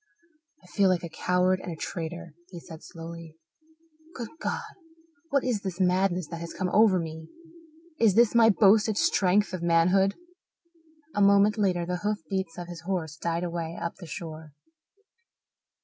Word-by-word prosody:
"I - - -19
feel 195 +2 +2
like 180 -2 +1
a 170 - -5
coward 180 +3 +1
and 180 - -6
a - - -5
traitor," 170 0 -6 0.2
he 175 -3 -9
said 160 -1 -12
slowly. 165 -1 -10 0.8
"Good 235 -3 -6
God, - - -4 0.6
what 280 -4 +1
is 235 -5 -1
this 190 -2 -5
madness 185 -1 +1
that 170 - -6
has 170 - -7
come 185 - -2
over 210 -3 +5
me? 160 -1 -5 0.7
Is 215 -5 +4
this 235 -1 +5
my 230 -1 +6
boasted 215 +1 +4
strength 195 +1 +2
of 185 - -4
manhood?" 180 +4 +3 1.0
A 205 - 0
moment 200 +1 +5
later 185 -5 0
the 180 +1 -2
hoof 210 +3 -1
beats 190 -4 -3
of 175 -1 -6
his 175 -1 -9
horse 170 -4 -3
died 170 +2 -2
away 170 -1 -4
up 170 - -4
the 175 - -10
shore. 160 -2 -8
180 Hz, 165 wpm, -27 LUFS, 170-200 Hz, 1.0 s, my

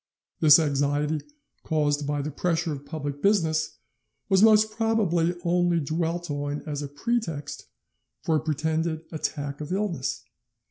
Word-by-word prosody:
"This 150 -3 +8
anxiety, 145 0 0 0.4
caused 145 -2 0
by 145 -1 -1
the 150 - -4
pressure 165 +1 -1
of 145 0 -9
public 145 -3 -5
business, 165 -6 +1 0.5
was 190 -1 +4
most 215 0 +6
probably 205 -7 +1
only 175 0 +2
dwelt 165 +2 -2
on 145 0 -3
as 150 -2 -4
a 145 - -4
pretext 155 - -3 0.6
for 160 - +1
a - - +3
pretended 160 +1 -1
attack 145 -2 -4
of 150 +3 -6
illness. 185 -9 -2
160 Hz, 135 wpm, -26 LUFS, 145-175 Hz, 0.6 s, This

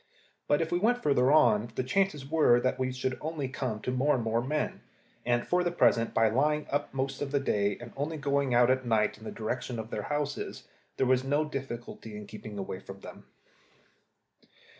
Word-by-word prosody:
But 145 +2 +3
if 165 - -6
we 175 - +2
went 245 +5 +2
further 135 -2 +3
on, 115 -7 +4
the - - 0
chances 150 -1 0
were 150 -6 +4
that 130 +1 0
we 130 0 0
should 130 0 -3
only 155 -3 -3
come 130 -4 -3
to 125 - -2
more 135 +4 +2
and 120 - -1
more 115 +1 +1
men; 150 +4 -2 0.5
and 120 0 +2
for 180 0 +2
the 175 - +1
present, 115 -9 +3
by 115 - +3
lying 150 +6 +1
up 145 +1 -1
most 135 0 -3
of 145 - -2
the 140 0 +1
day, 100 -6 0
and 120 -1 -10
only 150 +4 -3
going 140 -2 0
out 120 +1 +5
at 130 0 +1
night 110 -3 +1
in 110 - -12
the - - -5
direction 120 +2 -3
of 110 0 -6
their 105 - -2
houses, 145 -1 -3 0.3
there - - +2
was 130 0 +3
no 145 +3 +1
difficulty 120 -6 -6
in 105 - -8
keeping 105 0 -9
away 95 -1 -4
from 95 0 -11
them. - - -11
130 Hz, 205 wpm, -29 LUFS, 115-145 Hz, 0.5 s, out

